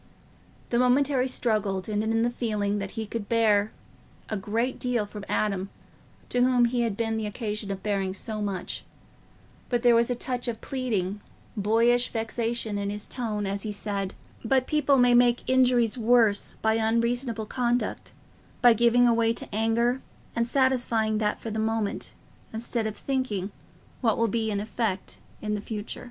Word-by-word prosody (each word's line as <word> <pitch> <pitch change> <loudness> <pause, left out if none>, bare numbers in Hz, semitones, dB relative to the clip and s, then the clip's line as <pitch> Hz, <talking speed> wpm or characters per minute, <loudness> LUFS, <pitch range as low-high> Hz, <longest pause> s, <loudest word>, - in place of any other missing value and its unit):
The 235 - +2
momentary 255 +1 +3
struggle 215 -6 0
ended 215 0 -1
in 225 0 +2
the 240 - +1
feeling 210 -4 -1
that 195 -1 -5
he 220 - -2
could 215 -1 -5
bear 215 -2 +3 0.6
a 215 - -1
great 225 +5 -1
deal 245 -4 0
from 205 0 -9
Adam, 195 -2 0 0.6
to 245 - +1
whom 250 -1 +4
he 240 +1 0
had 225 -4 -1
been 225 -1 0
the 220 -1 -2
occasion 210 -1 -4
of 195 -1 -4
bearing 195 -2 -1
so 215 +1 -3
much; 195 -3 -3 0.9
but 240 -1 0
there 240 -1 +6
was 235 +1 +3
a 245 - 0
touch 245 0 -3
of 230 -2 -3
pleading, 210 -7 -2 0.3
boyish 230 +4 +3
vexation 225 -1 -2
in 200 0 -2
his 205 0 -4
tone 215 -5 -3
as 200 +1 -2
he 215 - -3
said, 200 -2 -3 0.3
"But 255 +2 +2
people 295 -2 +2
may 245 -1 +5
make 240 0 +4
injuries 250 -2 +3
worse 225 -3 +3
by 220 0 +3
unreasonable 230 +1 0
conduct—by 245 0 0
giving 235 +2 +4
way 230 0 +2
to - - -4
anger 230 +4 +1 0.3
and 235 0 +1
satisfying 240 -5 +2
that 210 -1 0
for 225 - -5
the 220 - -2
moment, 220 -1 -1 0.4
instead 225 0 -2
of 215 - -5
thinking 220 -8 -2 0.5
what 225 -4 +2
will 230 - +2
be 220 0 -1
the 200 0 -1
effect 215 -3 -3 0.2
in 210 0 -1
the 210 - -2
future. 210 0 -5
225 Hz, 165 wpm, -27 LUFS, 210-245 Hz, 0.9 s, there